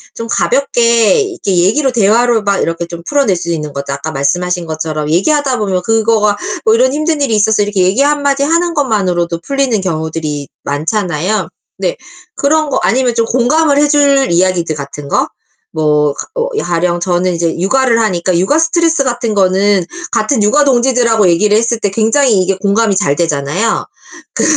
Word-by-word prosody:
좀 230 - -6
가볍게 235 - +2
이렇게 370 - -3
얘기로 255 +10 +2
대화로 230 +2 +2
막 200 -1 +1
이렇게 165 +1 -2
좀 170 0 -9
풀어낼 275 -11 +1
수 170 - -5
있는 150 -2 -4
거죠. 140 0 -5
아까 145 +3 -5
말씀하신 175 +5 -1
것처럼 155 -1 -4
얘기하다 260 - +1
보면 190 -3 -1
그거가 220 -1 +1 0.3
뭐 220 - +4
"이런 255 +3 +2
힘든 305 +1 -1
일이 235 -6 +1
있었어." 210 0 +2
이렇게 205 -2 0
얘기 190 +9 +1
1 290 0 +1
마디 280 0 +1
하는 335 +3 +1
것만으로도 185 - -1
풀리는 275 -6 0
경우들이 160 -4 -4 0.2
많잖아요. 175 +5 -2 0.3
네. - - -2 0.4
그런 310 +1 +1
거 275 - -1
아니면 250 0 +1
좀 230 - +1
공감을 280 +6 +1
해줄 285 -2 +3
이야기들 175 -2 +1
같은 140 0 -8
거 - - +1 0.5
뭐 150 -2 +1 0.2
어 - - -1
가령 175 0 -1
저는 180 0 0
이제 165 -1 -1
육아를 235 +4 +2
하니까 185 -5 0
육아 240 - +1
스트레스 330 -2 +1
같은 240 -3 -2
거는 195 -1 +2 0.3
같은 220 +2 +1
육아 245 +9 +3
동지들하고 240 -5 +2
얘기를 205 +5 +2
했을 235 0 0
때 205 - -1
굉장히 225 0 +2
이게 190 +1 -1
공감이 200 +1 +1
잘 145 -8 +1
되잖아요. 165 +6 -1 0.5
그 - - -1
210 Hz, 370 characters per minute, -13 LUFS, 175-265 Hz, 0.5 s, 뭐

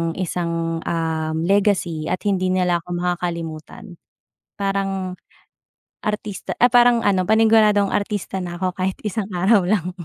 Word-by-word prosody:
isang, 170 -2 -2
uhm, 160 -1 -2
legacy 180 -4 +1
at 185 - -2
hindi 190 -3 +1
nila 180 -2 +2
ako 170 - -21
makakalimutan. 170 -1 -4 0.6
Parang 195 -2 -2 0.9
artista 210 -1 -4
ay 245 0 +6
parang 240 -1 +5
ano 190 -2 +2
panigunadong 215 -2 +4
artista 205 -2 -2
na 175 -1 -5
ako 185 -1 0
kahit 185 0 -1
isang 210 0 -2
araw 190 +3 +4
lang. 185 -3 0
185 Hz, 125 wpm, -21 LUFS, 170-205 Hz, 0.9 s, ay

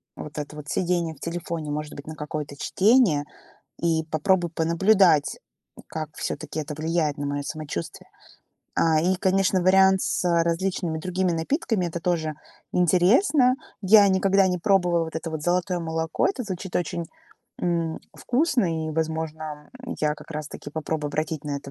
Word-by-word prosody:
вот 150 0 -9
это 150 0 -5
вот 150 -1 -9
сидение 175 -2 0
в - - -21
телефоне, 170 -2 -4
может 150 0 -4
быть, 145 - -10
на 155 - -6
какое-то 150 -1 -5
чтение, 195 - +3 0.6
и 160 -1 +1
попробую 175 +2 +2
понаблюдать, 170 0 +3 0.4
м, - - -14
как 155 -1 -4
всё-таки - - -4
это 150 0 -5
влияет 155 -1 -1
на 145 - -2
моё 145 0 -2
самочувствие. 145 - -6 0.7
А, 160 -1 +3
и, 180 +4 +2
конечно, 190 0 +2
вариант 190 +1 +5
с - - -1 0.2
различными 170 -1 -1
другими 185 +2 -1
напитками- 185 - 0
это 170 0 -4
тоже 160 -3 -1 0.4
интересно. 225 - +4 0.3
Я 205 +1 +7
никогда 195 0 +3
не 180 0 0
пробовала 175 -3 +2
вот 160 0 -6
это 160 0 -4
вот 155 -1 -4
золотое 180 +1 0
молоко. 160 -1 -1
Это 270 -10 -3
звучит 190 -2 -4
очень, 170 -1 -2 0.5
м, 170 -2 -1 0.2
вкусно, 240 - 0
и, - - -3
возможно, 155 -1 -4
м, 255 - -6
я 150 -1 +1
как - - -14
раз-таки 150 -1 -6
попробую 155 0 -3
обратить 155 0 -2
на 145 -1 -2
это 140 0 -9
165 Hz, 160 wpm, -25 LUFS, 155-185 Hz, 0.7 s, Я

